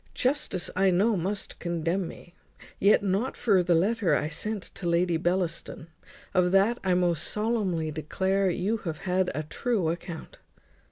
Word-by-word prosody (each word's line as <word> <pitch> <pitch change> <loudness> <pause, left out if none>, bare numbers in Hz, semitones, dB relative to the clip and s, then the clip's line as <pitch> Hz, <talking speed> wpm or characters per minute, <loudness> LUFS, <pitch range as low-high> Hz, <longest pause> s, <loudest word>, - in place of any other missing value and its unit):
Justice 255 -9 0
I 190 +1 +4
know 200 +5 +3
must 190 +3 -3
condemn 170 +1 -1
me. 175 +1 -12 0.5
Yet 200 +1 +4
not 200 +6 0
for 200 -5 +3
the 175 -1 +2
letter 200 +3 +2
I 150 - -1
sent 210 +5 -3
to 175 - -3
Lady 170 0 +2
Bellaston. 170 -1 -2 0.4
Of 180 -2 +3
that 205 +5 +4
I 185 -2 +2
most 175 -3 +1
solemnly 205 -8 0
declare 190 +5 0
you 190 +6 0
have 165 -7 -6
had 185 0 +1
a 155 - -2
true 190 +2 -1
account." 170 0 -6
185 Hz, 155 wpm, -27 LUFS, 170-200 Hz, 0.5 s, I